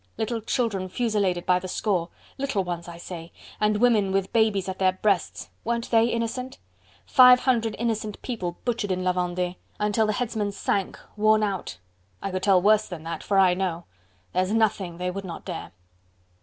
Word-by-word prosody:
little 225 +1 -2
children 210 -5 -1
fusilladed 200 -5 0
by 180 0 +3
the 185 - -7
score... 180 -2 -1 0.3
little 270 -8 0
ones, 175 -1 -5
I 170 -1 -8
say, 170 -1 -8 0.3
and 210 0 +2
women 215 -4 +3
with 195 0 -1
babies 215 -4 +2
at 190 0 -5
their 185 -1 +3
breasts... 190 -1 -1
weren't 235 +1 -2
they 225 -1 +5
innocent?... 235 +2 -3 0.5
Five 250 -1 +7
hundred 230 -4 +1
innocent 220 -2 -2
people 185 -9 -4
butchered 230 -5 -1
in 185 0 -1
La 185 - +3
Vendee... 180 0 -2 0.2
until 210 +1 +2
the 215 - +1
Headsman 215 -3 -2
sank 195 -1 -1 0.2
worn 215 +1 +4
not... 195 - -2 0.4
I 195 - -4
could 185 0 -2
tell 190 -1 +5
worse 215 +1 +4
than 170 -3 -7
that... 165 0 -5
for 200 - 0
I 185 -2 +6
know.... 180 -2 -2 0.5
There's 185 +2 +1
nothing 200 -6 +1
they 180 +1 -2
would 195 +2 -5
not 175 -3 -8
dare!..." - - -6
200 Hz, 180 wpm, -25 LUFS, 180-225 Hz, 0.5 s, Five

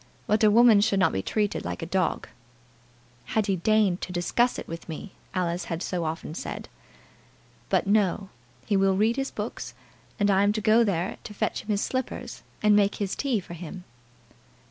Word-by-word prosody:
But 215 +1 +2
a 215 - +7
woman 225 -1 +6
should 205 -1 +2
not 190 - +4
be 95 - -1
treated 210 - -1
like - - -4
a - - -2
dog. 185 +2 -1 1.1
"Had 215 - +3
he 195 - +1
deigned 205 -1 +2
to - - -5
discuss 180 +8 +1
it - - -7
with 165 +1 -8
me!" 165 +5 -7 0.2
Alice 175 -1 -1
had 165 +2 -4
so 175 -3 -2
often 155 0 -4
said. - - -6 1.0
"But, - - +2
no; 200 -1 +1 0.4
he 205 - +1
will 195 -1 +3
read 220 +3 +3
his 270 0 -2
books, - - -6 0.4
and 205 0 +3
I 195 0 +4
am 205 +1 +3
to 215 - -1
go 220 +3 +4
there 190 -4 -1
to 210 - -9
fetch - - -1
him - - -19
his 210 -2 0
slippers, 260 -1 -4 0.2
and 210 -1 +6
make 205 -1 +3
his 200 -2 -2
tea 265 -6 0
for 175 - -10
him." 175 +2 -8
200 Hz, 190 wpm, -26 LUFS, 180-215 Hz, 1.1 s, a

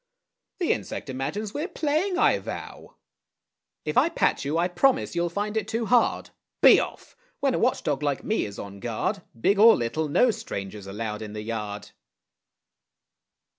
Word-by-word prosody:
The 355 -3 +2
insect 135 - -6
imagines 195 +11 -4
we're 305 +4 -2
playing, 340 +2 0
I - - +4
vow! - - -8 0.9
If - - +3
I - - +3
pat - - +1
you, 145 +3 -1
I 175 +1 +2
promise 255 +6 +1
you'll 170 0 +1
find 205 +4 -3
it 215 -2 -1
too 225 +1 -2
hard. 235 +3 +2 0.3
Be - - +9
off! - - -6 0.2
when 275 -2 +1
a - - 0
watch 250 +2 +1
dog 145 -1 -1
like 145 -2 -1
me 220 - 0
is 100 -1 -8
on 100 0 -8
guard, 120 - -2 0.2
Big 200 - +2
or 225 +2 +8
little, 130 +7 -1
no 235 - +4
stranger's 100 - -6
allowed 105 +2 -4
in 105 -1 -7
the 105 0 -5
yard. 105 -2 -5
170 Hz, 170 wpm, -26 LUFS, -, 0.9 s, Be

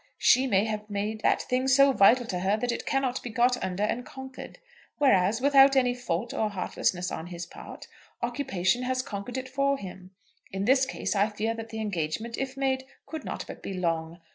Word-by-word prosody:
She 260 +1 +4
may 200 -3 +3
have 215 -1 -4
made 210 +2 -3
that - - +2
thing 255 +1 0
so 275 +1 +6
vital 245 +3 +5
to 180 -5 -3
her 195 +3 +1
that 245 +2 -1
it 235 - -5
cannot 265 -2 0
be 245 - -6
got 245 +2 +2
under 185 +2 -2
and 230 +3 -1
conquered; 265 0 -10 0.4
whereas, 225 -5 +3
without 275 0 +6
any 250 -2 +3
fault 235 -3 -3
or 215 - 0
heartlessness 180 -2 -1
on 160 - -5
his 175 -1 -6
part, - - -11 0.4
occupation 240 -4 0
has 255 0 -1
conquered 205 +4 -6
it 260 0 -4
for 275 +1 +1
him. 185 -4 -9 0.4
In 195 +1 -2
this 265 +2 +4
case - - -3
I 205 +2 +3
fear 215 +2 -2
that 225 0 -7
the 220 0 -6
engagement, 210 +3 -3
if 270 0 -4
made, 265 -1 0 0.2
could 315 - -7
not - - -5
but - - -10
be 195 - -5
long. 165 -1 -2
230 Hz, 200 wpm, -27 LUFS, 195-260 Hz, 0.4 s, so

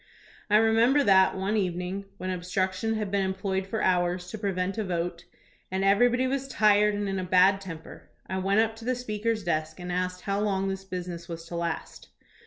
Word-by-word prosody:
I 210 - +4
remember 225 +6 +4
that, 190 -3 +5
one 195 +3 -1
even 180 -4 -1
ing, 195 +2 -5
when 185 -1 -3
obstruction 185 +4 -1
had 210 -3 -3
been 200 -1 +1
employed 190 0 -2
for 215 +2 -2
hours 180 0 +1
to - - -5
prevent 195 0 -2
a - - 0
vote, 175 -2 -3 0.4
and 190 +1 -1
everybody 245 +6 +4
was 270 +1 -1
tired 210 -4 +3
and 205 0 -2
in 195 -1 -2
a - - -2
bad 185 +2 +4
temper, 165 -5 -10 0.2
I 190 - -3
went 195 +3 +3
up 225 0 0
to 225 - -10
the 255 +1 +1
Speaker's 225 -2 -2
desk 155 -2 -2
and 180 0 -5
asked 180 0 -2
how 200 0 -1
long 195 -2 0
this 195 0 -5
business 180 -2 -6
was 165 -1 -6
to 175 - -5
last. 170 -1 -4
195 Hz, 200 wpm, -27 LUFS, 180-210 Hz, 0.4 s, that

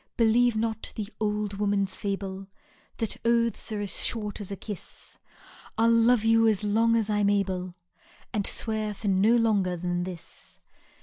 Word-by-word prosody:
Believe 235 0 +4
not 220 0 -2
the 210 -2 -4
old 210 -1 -2
woman's 200 -2 0
fable^ 195 -1 -4 0.5
That 225 -3 -2
oaths 235 -1 +1
are 210 -1 -2
as 205 - +1
short 210 -2 -2
as 200 - -6
a - - -2
kiss; 205 0 -8 0.6
I 225 - +3
'U 230 - +5
love 230 0 +4
you 225 0 +4
as 215 -2 +1
long 225 +3 +3
as 225 -2 +1
I 210 -1 0
'm 205 - +3
able^ 185 -3 -1 0.6
And 205 -3 +1
swear 215 -2 -1
for 205 +1 -3
no 200 +5 +4
longer 205 -6 +2
than 175 0 -2
this. 180 -2 -8
210 Hz, 170 wpm, -27 LUFS, 195-225 Hz, 0.6 s, U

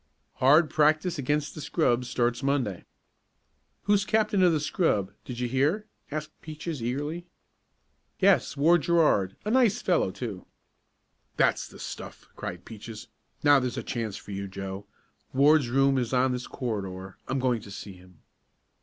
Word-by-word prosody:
"Hard 150 +5 +5
practice 155 +2 +2
against 145 +2 -1
the 155 - -8
scrub 125 -6 +1
starts 120 0 0
Monday." 135 -10 -1 1.0
"Who's 205 -1 +3
captain 215 -1 +2
of 180 -2 +6
the 155 - +1
scrub; 145 - 0
did 125 - -6
you 125 - 0
hear?" 145 - +1 0.2
asked 150 0 -4
Peaches 155 -2 -6
eagerly. 145 +8 -3 0.9
"Yes, - - +3
Ward 165 +4 +5
Gerard 150 - +2
a 210 - -1
nice 240 -4 +4
fellow, 175 - +1
too." 100 -1 -6 0.9
"That's - - +2
the - - -14
stuff!" - - -8
cried 90 0 -6
Peaches. 110 +1 -9 0.3
"Now 145 -1 +6
there's 130 0 -3
a 125 - -3
chance 110 -4 -3
for - - -11
you, 100 0 -4
Joe. 95 +1 -7 0.5
Ward's 140 -1 +4
room 135 +1 +3
is 120 0 -2
on 130 +1 +3
this 125 0 -4
corridor. 95 -6 -5
I'm 135 - -1
going 125 -3 +1
to 100 - -12
see 100 0 -8
him." 90 -2 -18
130 Hz, 155 wpm, -27 LUFS, 110-155 Hz, 1.0 s, of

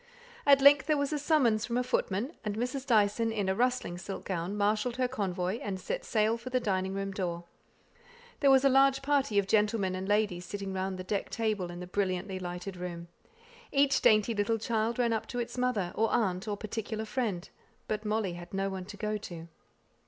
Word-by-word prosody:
At 280 -1 +7
length 280 +1 +7
there 305 -1 +3
was 285 +1 -1
a 300 - 0
summons 270 -8 +3
from 235 0 -1
a 250 - +1
footman, 245 - -1
and 210 -2 -2
Mrs. 255 +3 -3
Dyson, 225 -1 +3
in 205 -3 -1
a 190 - +2
rustling 245 -6 0
silk 195 +1 -6
gown, 185 +2 -3
marshalled 210 +4 +1
her 255 -1 +2
convoy, 195 -4 -2
and 195 -2 -4
set - - -4
sail 220 0 +1
for 245 +2 -7
the 255 0 +1
dining 190 -4 -1
room 195 0 -3
door. 175 -3 -3 1.0
There 280 - +4
was 270 0 +6
a - - +8
large 270 0 +4
party 275 -6 +1
of 200 - +4
gentlemen 210 -2 +2
and 185 +1 -4
ladies 205 -4 +1
sitting 195 +1 -5
round 190 0 -2
the 185 - -5
decked 200 +1 -3
table, 215 -6 -1
in 175 0 -7
the - - -5
brilliantly 190 0 -2
lighted 180 +1 -6
room. 175 -1 -6 0.6
Each 275 -1 +3
dainty 215 +1 +4
little 210 +2 +1
child 225 +1 -1
ran 235 -2 +2
up 220 - -2
to 245 - -4
its 240 0 -4
mother, 250 -8 0
or 225 +1 +1
aunt, 190 -2 0
or 205 -1 -2
particular 220 +1 -4
friend; 210 -6 -2 0.4
but 215 0 -2
Molly 210 -3 -1
had 175 +2 -8
no 195 0 -1
one 190 -1 -5
to 205 - -10
go 215 0 -1
to. 170 -5 -9
210 Hz, 205 wpm, -30 LUFS, 190-245 Hz, 1.0 s, a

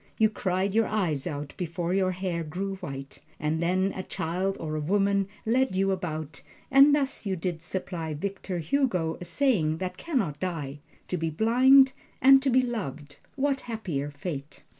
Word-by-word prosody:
You 220 -1 +4
cried 190 -1 -1
your 225 0 +3
eyes 175 -9 -1
out 145 -3 -5
before 175 0 -2
your 190 -1 +2
hair 180 -2 -2
grew 190 +5 -4
white, 135 -5 -7 0.2
and 155 +2 0
then 185 +3 +1
a 190 - -3
child 185 +3 -2
or 155 -1 -3
a - - -1
woman 200 +3 +2 0.2
led 250 -1 +2
you 195 +1 +2
about; 160 -5 -4 0.3
and 275 +2 +7
thus 275 -2 -1
did 190 -5 -3
you 180 -2 0
supply 170 -2 -4
Victor 190 +2 -4
Hugo 175 - 0
a - - -4
saying 175 - +1
that 185 +1 -4
can 330 -5 -2
not 150 - -1
die: 150 -6 -4 0.3
"To 180 - -1
be 165 0 -1
blind 255 - +6 0.3
and 270 +1 +7
to 270 - +1
be 255 0 +4
loved 150 - -5 0.2
what 275 0 0
happier 170 -11 -3
fate!" 145 -1 -7
185 Hz, 175 wpm, -27 LUFS, 160-220 Hz, 0.3 s, and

